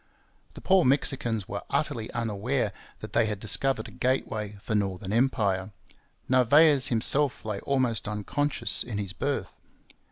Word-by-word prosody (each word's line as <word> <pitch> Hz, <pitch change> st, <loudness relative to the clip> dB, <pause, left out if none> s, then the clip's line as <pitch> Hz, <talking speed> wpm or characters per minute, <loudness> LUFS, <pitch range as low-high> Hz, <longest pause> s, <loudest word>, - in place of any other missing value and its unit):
The -, -, -10 dB
poor 190 Hz, -2 st, +4 dB
Mexicans 125 Hz, -6 st, +1 dB
were -, -, -5 dB
utterly 110 Hz, -1 st, -2 dB
unaware 115 Hz, 0 st, -2 dB, 0.3 s
that -, -, -8 dB
they 115 Hz, -2 st, +3 dB
had 105 Hz, -2 st, -3 dB
discovered 115 Hz, +3 st, -1 dB
a -, -, -12 dB
gateway 110 Hz, -5 st, -2 dB
for 110 Hz, -, -5 dB
northern 95 Hz, -2 st, -2 dB
empire. 105 Hz, -6 st, 0 dB, 0.5 s
Narvaez 135 Hz, +2 st, +5 dB
himself 130 Hz, +3 st, +2 dB
lay 105 Hz, -2 st, -3 dB
almost 125 Hz, -7 st, 0 dB
unconscious 120 Hz, +7 st, +1 dB
in 115 Hz, -4 st, -4 dB
his 100 Hz, -2 st, -4 dB
berth. 110 Hz, -2 st, -3 dB
115 Hz, 135 wpm, -27 LUFS, 105-135 Hz, 0.5 s, Narvaez